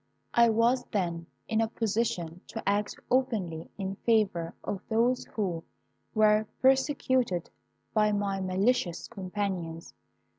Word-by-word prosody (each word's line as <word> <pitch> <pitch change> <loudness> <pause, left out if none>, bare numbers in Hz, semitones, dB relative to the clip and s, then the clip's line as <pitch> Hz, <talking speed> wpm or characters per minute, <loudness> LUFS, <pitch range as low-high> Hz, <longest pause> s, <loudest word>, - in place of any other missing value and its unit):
I 235 0 +6
was 235 +3 +3
then 170 -5 -2 0.2
in 220 0 +1
a 225 - +2
position 210 -7 -1
to 225 - -7
act 205 +1 +1 0.2
openly 210 -11 0
in 195 -1 -4
favour 200 -8 +1
of 195 - -3
those 235 +3 +2
who 180 -6 -1 0.5
were 215 0 +4
persecuted 260 - +2 0.4
by 210 -1 +4
my 200 -1 0
malicious 190 0 +1
companions. 185 -5 -4
210 Hz, 115 wpm, -29 LUFS, 185-230 Hz, 0.5 s, I